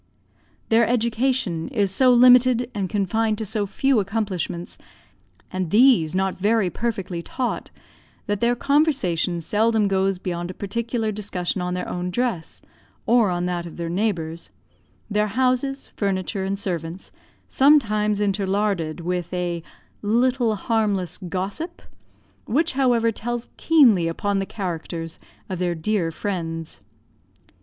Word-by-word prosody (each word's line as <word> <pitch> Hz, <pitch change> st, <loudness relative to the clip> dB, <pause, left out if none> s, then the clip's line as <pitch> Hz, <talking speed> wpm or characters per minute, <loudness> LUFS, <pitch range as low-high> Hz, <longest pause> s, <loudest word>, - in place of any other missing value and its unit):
Their 230 Hz, 0 st, +4 dB
education 235 Hz, -6 st, 0 dB
is 205 Hz, -8 st, 0 dB
so 255 Hz, +6 st, +4 dB
limited 250 Hz, 0 st, +6 dB
and 195 Hz, -4 st, -2 dB
confined 215 Hz, +3 st, 0 dB
to 220 Hz, -, -3 dB
so 210 Hz, 0 st, -1 dB
few 270 Hz, +4 st, +2 dB
accomplishments, 195 Hz, -4 st, -3 dB, 0.7 s
and 185 Hz, -2 st, -2 dB
these 210 Hz, -, +4 dB
not 190 Hz, 0 st, 0 dB
very 205 Hz, -2 st, +2 dB
perfectly 195 Hz, -7 st, -3 dB
taught, 250 Hz, +8 st, -3 dB, 0.6 s
that 205 Hz, -1 st, -1 dB
their 235 Hz, +2 st, +2 dB
conversation 245 Hz, -, +1 dB
seldom 215 Hz, +4 st, +2 dB
goes 195 Hz, -1 st, +1 dB
beyond 175 Hz, -1 st, -4 dB
a 185 Hz, -, -7 dB
particular 225 Hz, +2 st, -2 dB
discussion 190 Hz, -3 st, -3 dB
on 180 Hz, 0 st, -2 dB
their 180 Hz, -, -3 dB
own 180 Hz, 0 st, -3 dB
dress, 210 Hz, -4 st, -3 dB, 0.4 s
or 215 Hz, -7 st, +3 dB
that 175 Hz, -1 st, -2 dB
of 170 Hz, -, -11 dB
their 170 Hz, -1 st, -3 dB
neighbours, 170 Hz, -4 st, -2 dB, 0.6 s
their 210 Hz, 0 st, +1 dB
houses, 255 Hz, +4 st, 0 dB
furniture, 195 Hz, 0 st, -1 dB
and 195 Hz, +1 st, -2 dB
servants, 175 Hz, -2 st, -5 dB, 0.4 s
sometimes 215 Hz, -8 st, +3 dB
interlarded 195 Hz, -4 st, 0 dB
with 175 Hz, 0 st, -3 dB
a 175 Hz, -2 st, -2 dB, 0.4 s
little 235 Hz, +1 st, +2 dB
harmless 200 Hz, -5 st, -1 dB
gossip, 195 Hz, -, -4 dB, 0.7 s
which, 315 Hz, +7 st, +1 dB
however, 245 Hz, -4 st, +2 dB
tells 240 Hz, +2 st, -4 dB
keenly 240 Hz, -, +4 dB
upon 200 Hz, +4 st, -1 dB
the 195 Hz, -, -3 dB
characters 165 Hz, -4 st, -5 dB, 0.3 s
of 185 Hz, -2 st, -4 dB
their 175 Hz, -1 st, 0 dB
dear 170 Hz, +1 st, 0 dB
friends. 165 Hz, -, -4 dB
205 Hz, 125 wpm, -23 LUFS, 180-235 Hz, 0.7 s, limited